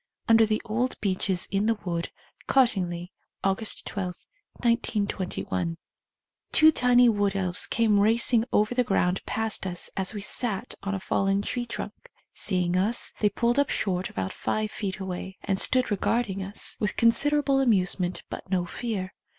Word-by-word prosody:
(Under 225 -1 +6
the 215 0 -1
old 235 +4 -1
beeches 190 -2 0
in 200 +2 +1
the 230 - +3
wood, 170 -1 -2 0.4
Cottingley, 185 -9 +1 0.3
August 195 +3 -1
12, 185 -4 -5 0.3
1921.) 190 - -1 0.7
Two 315 0 +7
tiny 245 -3 +4
wood 205 -3 +1
elves 185 -2 0
came 220 -3 +2
racing 225 +2 +4
over 215 +3 +2
the 250 0 +2
ground 195 -4 0
past 220 -3 -1
us 175 -2 -3
as 190 +2 -1
we 205 - -4
sat 210 0 -2
on 200 0 -3
g, - - -3
fallen 195 +1 0
tree 240 +2 -3
trunk. - - -7 0.2
Seeing 180 -3 -1
us, 205 +6 +1
they 210 - +3
pulled 240 +5 +1
up 285 - +2
short 185 -2 -1
about 95 -1 -4
five 215 0 -2
feet 195 -3 -4
away, 190 0 -6
and 195 -1 -1
stood 255 -3 +2
regarding 205 0 0
us 195 +2 -3
with 210 - -2
considerable 275 +4 +4
amusement 185 -6 +1
but - - -8
no 180 -2 0
fear. 195 -1 -4
205 Hz, 155 wpm, -26 LUFS, 185-230 Hz, 0.7 s, Two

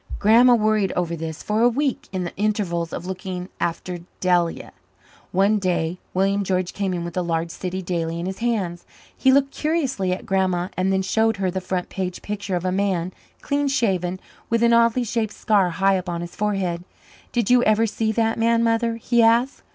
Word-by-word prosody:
Grandma 235 +4 +6
worried 215 -3 +2
over 170 -1 -1
this 160 -1 -6
for 210 +1 0
a 240 - +6
week 270 +2 -2
in 185 -1 -2
the 175 - -6
intervals 195 -5 -1
of 175 - -5
looking 185 -1 -5
after 175 +1 -3 0.2
Delia. 175 -2 0 0.6
One 200 +3 +3
day 180 -2 -1 0.2
William 195 +2 +2
George 185 -1 -1
came 200 -2 -2
in 170 -1 -3
with 170 - -7
a 180 - +1
large 165 -1 -2
city 185 +1 -4
daily 170 -2 -2
in 170 - -3
his 190 +1 -5
hands. 200 -8 -1 0.3
He 265 - +3
looked 275 0 +3
curiously 275 - -1
at 185 - -3
Grandma 185 -3 0
and 185 +1 +1
then 190 0 +1
showed 220 +3 +1
her 190 -2 0
the 190 +1 -3
front 185 -1 -3
page 185 -2 -4
picture 200 -2 -3
of 175 +1 -3
a 185 - +1
man, 185 -2 0 0.3
clean 285 0 0
shaven, 185 -9 0 0.3
with 230 0 +2
an 235 0 +5
oddly 235 +1 +4
shaped 225 -2 -2
scar 200 -4 +2
high 190 +2 +2
up 180 0 -7
on 170 -1 -3
his 175 0 -8
forehead. 190 -5 -1 0.5
"Did 240 -2 0
you 250 -1 +6
ever 215 +1 +4
see 220 0 -1
that 225 0 0
man, 230 0 +3
Mother?" 230 0 +1
he 235 +1 +1
asked. 235 +4 +3
195 Hz, 200 wpm, -22 LUFS, 180-225 Hz, 0.6 s, Grandma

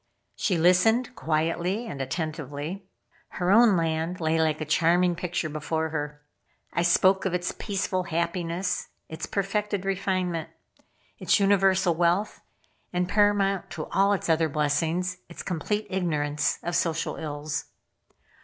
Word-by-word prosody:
She 185 -5 0
listened 220 +9 +3
quietly 165 +7 -1
and 140 -11 -5
attentively. 155 +4 -4 0.5
Her 180 +1 +1
own 220 -2 +6
land 165 +2 -1
lay 160 0 +1
like 155 -1 +1
a 155 - -3
charming 175 +3 +3
picture 175 -2 -2
before 160 +1 -2
her. 150 -1 -5 0.5
I 170 - +1
spoke 185 +3 +4
of 185 -2 0
its 180 0 -1
peaceful 190 -3 -2
happiness, 170 +2 -2 0.2
its 160 +1 -5
perfected 200 0 -1
refinement, 185 -3 -1 0.7
its - - +3
universal 195 -2 +3
wealth, 175 +5 +1 0.5
and 180 0 0
paramount 200 -1 +2
to 155 - -3
all 200 +1 +3
its 200 - -2
other 160 -1 +2
blessings, 160 +5 0
its 170 - -8
complete 205 +5 -2
ignorance 150 -5 0
of 175 0 -2
social 165 -1 0
ills. 150 -1 -4
175 Hz, 130 wpm, -26 LUFS, 160-190 Hz, 0.7 s, own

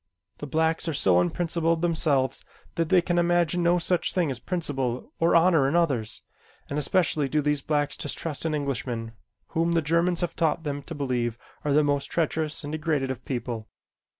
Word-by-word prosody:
The 145 - -6
blacks 160 +3 +1
are 160 - -1
so 90 -8 +4
unprincipled 165 - 0
themselves 155 -6 +1 0.3
that 165 -2 -1
they 180 -2 +5
can 175 0 +1
imagine 175 0 +2
no 175 +1 +3
such 175 +1 0
thing 170 -6 +1
as 125 - -5
principle 135 -8 -3
or 165 +1 +3
honor 165 -5 +4
in 150 - -1
others, 135 -11 0 0.5
and 145 - 0
especially 150 -2 +1
do 155 - +1
these 150 -1 0
blacks 145 0 0
distrust 150 +1 -3
an 160 -2 0
Englishman 125 -5 -3 0.4
whom 165 +1 0
the 165 - +3
Germans 170 +3 +1
have 175 - -2
taught 160 0 0
them 145 -2 -3
to 160 +4 -8
believe 125 -5 -1 0.3
are 150 - 0
the 150 +2 +4
most 145 -1 0
treacherous 160 -2 -1
and 145 - -5
degraded 150 -4 -1
of 130 - -7
people. 120 -4 -4
150 Hz, 180 wpm, -26 LUFS, 135-170 Hz, 0.5 s, they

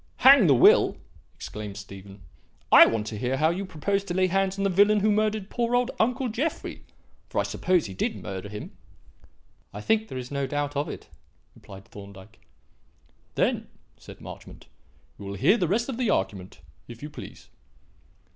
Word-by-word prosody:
"Hang 265 -7 +8
the 140 - +5
will!" 120 - +5 0.4
exclaimed 105 -2 -8
Stephen. 100 -1 -11 0.5
"I - - +9
want 110 -2 -1
to 110 -1 -6
hear 130 +3 -1
how 155 +3 +3
you 190 +3 -4
propose 195 +5 -2
to 175 -3 -4
lay 185 0 +3
hands 195 +1 0
on 195 - -2
the 195 - +2
villain 205 +3 +4
who 215 +1 +3
murdered 215 -1 -1
poor 240 0 0
old 245 +1 +1
uncle 250 +3 +1
Jeffrey 255 +8 -4 0.5
for - - -7
I - - +2
suppose 180 -3 0
he 95 - -7
did - - -2
murder 95 +1 -7
him?" 105 0 -9 1.0
"I 105 - -8
think 220 - 0
there 130 - -7
is 125 +1 -7
no 140 -1 -2
doubt 145 +1 -3
of 145 +3 -2
it," - - -8 0.5
replied 100 0 -14
Thorndyke. 100 0 -13 1.0
"Then," - - 0 0.3
said - - -14
Marchmont, - - -11 0.5
"we 100 - -8
will 100 - -5
hear 150 - +4
the 180 - 0
rest 230 +7 0
of 265 -4 -4
the 250 -3 0
argument, 95 -1 -2 0.3
if 120 +2 -11
you 150 - -6
please." - - -11
155 Hz, 180 wpm, -26 LUFS, -, 1.0 s, I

